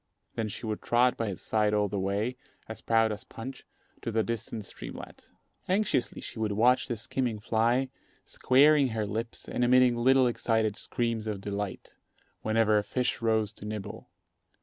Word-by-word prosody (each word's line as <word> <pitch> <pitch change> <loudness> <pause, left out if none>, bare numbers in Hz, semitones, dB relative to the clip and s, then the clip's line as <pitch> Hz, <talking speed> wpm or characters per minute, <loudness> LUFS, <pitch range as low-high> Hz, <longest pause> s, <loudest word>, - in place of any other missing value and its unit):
Then 110 - -2
she 105 - -6
would 110 -1 -3
trot 125 +1 +3
by 115 - -2
his 95 -3 -5
side 105 -1 +1
all 105 0 +2
the 100 0 -3
way, 100 +6 -1 0.3
as 110 0 -8
proud 115 -1 +3
as 105 0 -5
Punch, 130 +3 -9 0.3
to 115 - -3
the 110 0 +1
distant 110 0 -4
streamlet. - - -9 0.4
Anxiously 190 - 0
she - - -7
would 110 -2 0
watch 125 +4 +3
the 120 - -3
skimming 120 0 -2
fly, 120 +4 +1 0.4
squaring 140 +2 +4
her 110 -3 -2
lips 115 +3 -4
and 125 - -1
emitting 125 0 +5
little 130 +2 +4
excited 115 -3 +1
screams 115 -1 -2
of 105 -2 -3
delight, 100 0 -5 0.5
whenever 110 -1 +3
a - - -3
fish 125 +2 -1
rose 110 -2 +1
to 105 - -11
nibble. 105 -2 -6
115 Hz, 170 wpm, -29 LUFS, 105-125 Hz, 0.5 s, emitting